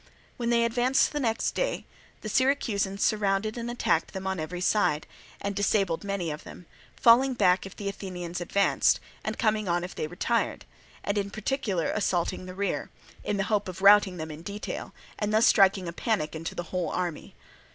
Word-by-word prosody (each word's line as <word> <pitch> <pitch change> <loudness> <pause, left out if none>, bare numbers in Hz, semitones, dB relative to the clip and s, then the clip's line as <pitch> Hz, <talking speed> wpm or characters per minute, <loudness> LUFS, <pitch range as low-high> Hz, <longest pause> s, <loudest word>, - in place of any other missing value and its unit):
When 235 -1 -2
they 235 -1 +3
advanced 245 +3 +2
the 295 - -1
next 225 -5 0
day - - -2 0.4
the - - -6
Syracusans 215 -6 +1
surrounded 210 0 +1
and 235 0 -4
attacked 200 -9 0
them 190 0 -5
on 190 -2 -2
every 160 +3 -4
side, 180 -5 +1 0.3
and 200 0 -3
disabled 195 -4 +1
many 195 -5 -2
of 150 - -7
them, 180 - -11 0.3
falling 250 +3 +5
back 190 -3 +3
if 195 - -12
the 200 - -5
Athenians 180 -3 -5
advanced 200 +3 +2 0.2
and - - -3
coming 215 -3 +1
on 175 0 +1
if 180 - -6
they 155 - -3
retired, 215 +7 -1 0.4
and 200 +1 0
in 200 0 -2
particular 215 - -1
assaulting 185 -3 -1
their 185 - -8
rear, 200 +1 -2 0.3
in 210 - -1
the 195 - +1
hope 205 +1 0
of 185 +1 -8
routing 200 -2 +6
them 160 -1 -5
in 155 +1 -9
detail, 200 +4 -6 0.3
and 210 0 -1
thus 220 +2 +4
striking 195 -4 +4
a 170 - -4
panic 195 -7 -1
into 160 +1 -5
the 175 - -3
whole 180 -2 0
army. 175 -4 -4
200 Hz, 185 wpm, -27 LUFS, 180-215 Hz, 0.4 s, routing